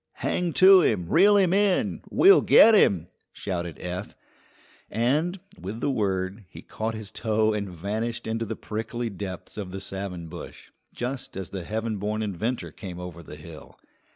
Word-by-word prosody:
"Hang 180 -1 -1
to 190 0 +8
him! 95 - +1
Reel 200 - +5
him 185 -3 +3
in! 200 -1 +1
We'll 395 +1 +6
get 225 - +7
him!" 95 - +4 0.3
shouted 85 -4 -5
Eph; 90 0 -6 0.7
and, 150 - 0 0.2
with 100 +6 -6
the 140 - 0
word, 95 -2 -2
he - - -12
caught 110 +1 -4
his 110 -2 -7
toe 110 -1 +1
and 100 -2 -3
vanished 110 +7 -4
into 115 +1 -2
the - - -4
prickly 115 +2 -4
depths 95 +1 -7
of 100 -3 -5
the 95 +1 -6
savin 95 -3 -5
bush, 85 +2 -10 0.2
just 125 -3 -4
as 95 -3 -6
the 95 -3 -5
heaven 110 +1 -3
born 105 +2 -2
inventor 110 +5 -3
came 90 -4 -8
over 90 -1 -8
the 75 -2 -11
hill. 80 +1 -12
105 Hz, 165 wpm, -25 LUFS, 95-120 Hz, 0.7 s, to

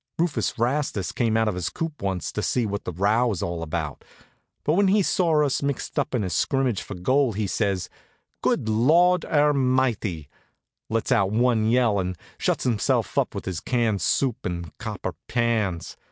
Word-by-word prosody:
Rufus 165 -3 0
Rastus 120 -5 0
came 115 -2 +1
out 110 0 +2
of 105 - +1
his 90 -1 -2
coop 160 -2 -5
once 95 -2 -2
to 105 - -3
see 120 +2 0
what 100 0 -4
the - - -3
row 105 +8 +2
was 100 -7 -2
all 85 -1 -3
about; 80 -3 -4 0.6
but 150 - +2
when 195 +3 +3
he 200 +1 +4
saw 165 -6 +2
us 140 - 0
mixed 140 -2 -2
up - - -1
in 115 - 0
a 95 - -2
scrimmage 130 - +1
for - - -7
goal 130 +7 +2
he 105 +1 -1
says: 100 -2 -1 0.5
"Good - - +1
Lawd 165 +11 +4
ermighty!" 130 - +1 0.6
lets 115 0 -1
out 100 -1 +3
one 110 0 +2
yell, 115 -4 +3
and 90 -1 -3 0.2
shuts - - 0
himself 115 -5 0
up - - -1
with - - -5
his 95 -4 -3
canned 115 -5 0
soup 130 -2 0
and 85 -2 -5
copper - - -4
pans. 110 -7 -1
115 Hz, 180 wpm, -24 LUFS, 95-135 Hz, 0.6 s, he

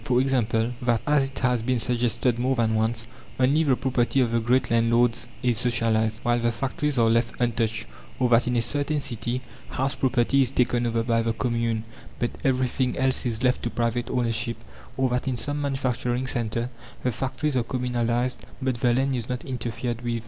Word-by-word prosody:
For 125 +2 +2
example, 120 -3 +1
that, 120 -2 +1
as 145 -2 +3
it 135 - -13
has 125 -2 +1
been 125 +2 0
suggested 120 +1 0
more 130 +2 +1
than 115 -2 +1
once, 110 +1 0 0.3
only 140 +5 +4
the 135 -4 +3
property 130 0 +1
of 120 -3 +2
the 115 - +2
great 120 +3 +1
landlords 115 +1 +2 0.2
is 120 -3 +2
socialized, 110 -2 +1
whilst 120 0 +2
the 120 0 +2
factories 135 +4 -2
are 115 -1 +4
left 115 +1 +1
untouched; 115 -2 0 0.3
or 125 - +2
that, 120 0 +4
in 125 - +1
a 115 - +2
certain 145 +3 0
city, 120 -1 -3 0.3
house 135 +2 -1
property 130 +1 +2
is 130 - +2
taken 120 -2 +1
over 115 0 0
by 115 -1 +2
the 115 0 0
Commune, 115 -2 -1 0.3
but 120 - -1
everything 130 -1 +1
else 130 -1 +2
is 115 0 -2
left 125 0 +2
to 120 - -2
private 120 0 -1
ownership; 115 -1 -1 0.4
or 130 0 +2
that, 125 +2 -1
in 130 -2 0
some 145 +5 -2
manufacturing 130 -2 -1
centre, 120 -1 -2 0.3
the 125 - +1
factories 135 +4 -2
are 125 - +2
communalized, 125 0 -1 0.2
but 130 -3 -1
the 120 -1 +3
land 135 +1 +1
is 120 -1 -4
not 125 0 -3
interfered 120 -1 -3
with. 120 -1 -2
120 Hz, 190 wpm, -25 LUFS, 115-130 Hz, 0.4 s, only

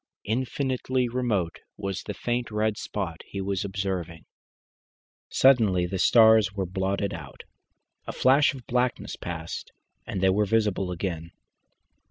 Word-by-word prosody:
Infinitely 130 +2 -1
remote 115 -8 -1 0.2
was 100 -1 -3
the 105 - -6
faint 120 +3 -2
red 110 0 0
spot 95 -6 -4
he 100 - -6
was 95 -1 -1
observing. 95 -5 -4 1.0
Suddenly 110 -10 +4
the 95 +1 -3
stars 110 -3 +6
were 100 -2 -2
blotted 95 +2 -1
out. - - -9 0.6
A - - -2
flash 140 +2 +4
of 130 - -11
blackness 125 0 -1
passed, 80 -1 -6 0.4
and 110 -4 -3
they 95 0 +4
were 105 +2 +2
visible 105 -3 +1
again. 85 -2 -4
100 Hz, 130 wpm, -26 LUFS, 95-120 Hz, 1.0 s, stars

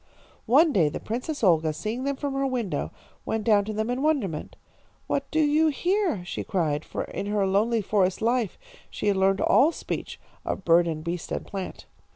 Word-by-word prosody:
"One 295 +6 +5
day 165 -8 +3
the - - -5
Princess 250 +5 -4
Olga, 160 -4 +3
seeing 215 - -4
them 280 0 0
from 280 0 -3
her 275 0 0
window, 240 -7 -2 0.3
went 220 -1 -2
down 205 -3 +4
to 215 - -4
them 220 +3 -1
in 250 +2 -2
wonderment. 260 - -1 0.5
'What 275 - -2
do 315 - 0
you 310 +1 +4
here?' 345 - 0
she - - -4
cried, 155 -5 -1
for - - -4
in 200 - -5
her 205 -1 +1
lonely 215 +4 +2
forest 190 -2 +1
life 230 -2 0 0.3
she - - -5
had 200 - +2
learned 190 +1 +2
all 300 +5 +5
speech - - -5 0.2
of 190 - -4
bird 170 0 +5
and 155 -2 -3
beast 170 +1 -4
and - - -3
plant. 195 -2 -6
215 Hz, 195 wpm, -26 LUFS, 185-275 Hz, 0.5 s, One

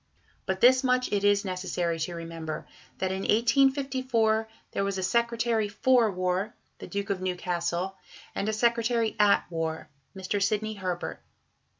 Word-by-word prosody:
But 190 0 -1
this 255 +2 +6
much 250 -1 +1
it 200 -1 +1
is 205 0 +3
necessary 180 -3 -2
to 170 +2 -3
remember, 165 -2 -6 0.3
that 190 0 -1
in 190 - -2
1854 240 -1 +2 0.2
there - - -1
was 195 -1 -1
a 190 - -2
Secretary 235 +1 +1
for 235 +2 +3
War 185 +2 -1 0.2
(the - - -8
Duke 200 0 -3
of 190 -2 -2
Newcastle) 180 0 -2 0.4
and 205 - -1
a - - +2
Secretary 230 0 +1
at 205 -1 +4
War 160 -1 -3 0.3
(Mr. 190 +2 -2
Sidney 215 +2 0
Herbert). 185 -4 -4
200 Hz, 150 wpm, -28 LUFS, 185-230 Hz, 0.4 s, this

